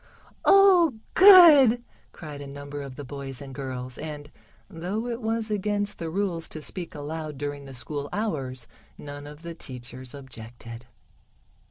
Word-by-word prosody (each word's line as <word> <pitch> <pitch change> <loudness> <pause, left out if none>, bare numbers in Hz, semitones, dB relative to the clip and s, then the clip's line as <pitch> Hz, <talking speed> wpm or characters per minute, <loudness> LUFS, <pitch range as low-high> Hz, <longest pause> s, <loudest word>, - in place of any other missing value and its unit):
"Oh, 370 - +6 0.2
good!" 315 - +9 0.3
cried 150 -3 -9
a 140 - -8
number 145 +1 -7
of 135 -2 -8
the 145 - -7
boys 135 -1 -7
and 135 -1 -9
girls, 130 -2 -6
and, 150 -1 -7 0.4
though 185 +7 -4
it 240 0 -4
was 225 0 -2
against 205 0 -1
the 165 - -4
rules 175 -2 -2
to 155 - -7
speak 170 +2 -7
aloud 150 0 -6
during 145 0 -5
the 135 - -10
school 145 +3 -5
hours, 135 - -3 0.3
none 145 0 -9
of 150 +2 -12
the 170 0 -6
teachers 125 -3 -9
objected. 120 -2 -11
150 Hz, 150 wpm, -26 LUFS, 135-205 Hz, 0.4 s, good